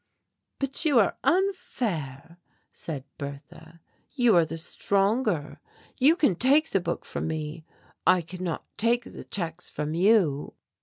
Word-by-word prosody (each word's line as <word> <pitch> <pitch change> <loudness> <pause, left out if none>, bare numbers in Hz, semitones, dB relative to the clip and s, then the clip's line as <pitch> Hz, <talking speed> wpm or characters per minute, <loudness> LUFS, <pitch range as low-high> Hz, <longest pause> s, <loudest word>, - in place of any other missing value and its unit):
"But 275 +1 -1
you 295 -6 +3
are 205 - +3
unfair," 180 - -1 0.3
said 145 -5 -6 0.2
Bertha, 155 +4 -9 0.3
"you 245 -7 +4
are 170 -2 +5
the 165 - -6
stronger. 195 - 0 0.4
You 290 +6 +6
can 300 - +3
take 280 - +3
the 195 - +3
book 170 0 -3
from - - -4
me. 155 0 -4 0.4
I 180 -2 +5
cannot 180 -1 -5
take 235 +2 +2
the - - -10
checks 170 -2 -4
from 150 +1 -3
you." 175 -6 +2
180 Hz, 135 wpm, -27 LUFS, 160-240 Hz, 0.4 s, You